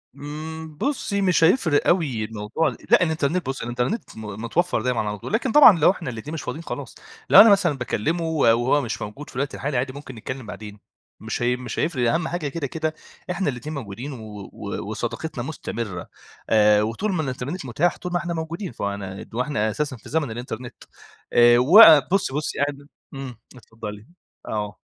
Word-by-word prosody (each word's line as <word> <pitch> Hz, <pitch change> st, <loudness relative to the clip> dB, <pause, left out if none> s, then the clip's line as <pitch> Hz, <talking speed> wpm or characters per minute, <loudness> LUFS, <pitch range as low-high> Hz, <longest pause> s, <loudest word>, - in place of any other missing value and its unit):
إمم، 155 Hz, +2 st, -7 dB
بُصي 205 Hz, -, -1 dB
مش 185 Hz, -4 st, +3 dB
هيفرق 160 Hz, -, +3 dB
أوي 145 Hz, -11 st, +1 dB
الموضوع 110 Hz, +8 st, -2 dB
ال -, -, -3 dB
لأ -, -, +6 dB
الإنترنت 160 Hz, +1 st, 0 dB
بُصي 135 Hz, -1 st, -4 dB
الإنترنت 125 Hz, -, -3 dB
م 110 Hz, -, -7 dB, 0.2 s
متوفر 160 Hz, +2 st, 0 dB
دايمًا 125 Hz, 0 st, 0 dB
على 105 Hz, -1 st, -2 dB
طول، 105 Hz, -, -8 dB
لكن 230 Hz, +2 st, +1 dB
طبعًا 235 Hz, -, +8 dB
لو 160 Hz, -, +6 dB
إحنا 175 Hz, -8 st, -6 dB
الاتنين 125 Hz, +6 st, -7 dB
مش 160 Hz, -, -4 dB
فاضين 160 Hz, -, -5 dB
خلاص، -, -, -7 dB, 0.3 s
لو -, -, +10 dB
أنا 225 Hz, -, +8 dB
مثلًا 185 Hz, -7 st, +3 dB
باكلّمه 135 Hz, +7 st, -1 dB
وهو 140 Hz, -4 st, +3 dB
مش 120 Hz, -, -4 dB
موجود 105 Hz, +8 st, -7 dB
في -, -, -15 dB
الوقت 140 Hz, +2 st, -2 dB
الحالي 140 Hz, -1 st, -2 dB
عادي 130 Hz, +2 st, -1 dB
ممكن 140 Hz, -2 st, -9 dB
نتكلم 130 Hz, +3 st, -6 dB
بعدين، 105 Hz, -1 st, -9 dB, 0.4 s
مش -, -, -4 dB
هي 120 Hz, +1 st, +2 dB
مش 125 Hz, -2 st, -6 dB
هيفرق 130 Hz, -8 st, +1 dB
أهم 165 Hz, -1 st, 0 dB
حاجة 175 Hz, -4 st, -3 dB
كده 145 Hz, 0 st, -3 dB
كده 155 Hz, +3 st, -3 dB, 0.4 s
إحنا 180 Hz, -2 st, -1 dB
الاتنين 145 Hz, +4 st, -5 dB
موجودين 120 Hz, +2 st, -6 dB
و 105 Hz, -4 st, -9 dB
و -, -, -6 dB
وصداقتنا 160 Hz, -7 st, -4 dB
مستمرة 115 Hz, -, -5 dB, 0.4 s
آآ 105 Hz, -1 st, +5 dB
وطول 115 Hz, -, -2 dB
ما 165 Hz, -, 0 dB
الإنترنت 135 Hz, +5 st, -4 dB
متاح 150 Hz, +8 st, 0 dB
طول 180 Hz, -, -6 dB
ما 175 Hz, -, +1 dB
إحنا 170 Hz, 0 st, -3 dB
موجودين، 165 Hz, +3 st, -4 dB
فأنا 100 Hz, -3 st, -5 dB
وإحنا 120 Hz, -3 st, 0 dB
أساسًا 140 Hz, +4 st, -2 dB
في -, -, -14 dB
زمن 150 Hz, -5 st, -1 dB
الإنترنت 120 Hz, +1 st, -7 dB, 0.5 s
آآ 120 Hz, 0 st, +7 dB
و 155 Hz, -, +8 dB, 0.3 s
بُصي 195 Hz, -8 st, +1 dB
بُصي 150 Hz, +1 st, -3 dB
أنا 145 Hz, 0 st, -2 dB, 0.3 s
إمم، 135 Hz, -3 st, -7 dB, 0.2 s
اتفضّلي، 110 Hz, -3 st, -9 dB, 0.4 s
آه. 105 Hz, -1 st, -3 dB
135 Hz, 185 wpm, -23 LUFS, 115-160 Hz, 0.5 s, لو